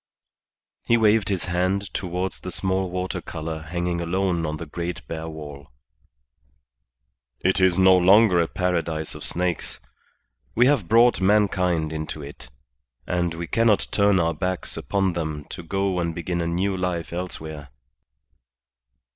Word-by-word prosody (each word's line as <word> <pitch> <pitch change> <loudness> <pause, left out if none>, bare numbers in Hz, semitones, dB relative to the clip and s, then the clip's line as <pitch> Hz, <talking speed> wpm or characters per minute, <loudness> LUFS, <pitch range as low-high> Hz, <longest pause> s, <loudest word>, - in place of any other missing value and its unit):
He 120 - +3
waved 110 -1 +3
his 95 -3 -1
hand 95 +3 -1
towards 90 0 -3
the - - -7
small 95 0 -1
water 90 +1 -3
colour 80 0 -5
hanging 85 +1 -2
alone 85 -1 0
upon 75 0 -3
the 85 - -6
great 85 +3 -5
bare 80 0 -5
wall. 75 -3 -9 1.7
"It 95 +2 +2
is 95 -1 +4
no 95 0 +7
longer 95 0 +6
a 85 - 0
Paradise 85 -4 -2
of - - -9
snakes. 90 -1 -2 0.8
We 120 - +5
have 130 -10 +2
brought 115 +1 +5
mankind 90 -5 +2
into 80 -1 -5
it, 70 -3 -11 0.6
and 85 -1 -1
we 85 +1 -4
cannot 115 +3 +2
turn 100 -2 +3
our 85 -1 +1
backs 90 +3 -3
upon 95 -2 0
them 80 -3 -4
to - - -7
go 95 +2 -1
and 85 -1 -2
begin 85 0 -2
a 85 - -1
new 95 +3 0
life 90 -2 -3
elsewhere." 80 -5 -5
90 Hz, 145 wpm, -24 LUFS, 80-95 Hz, 1.7 s, no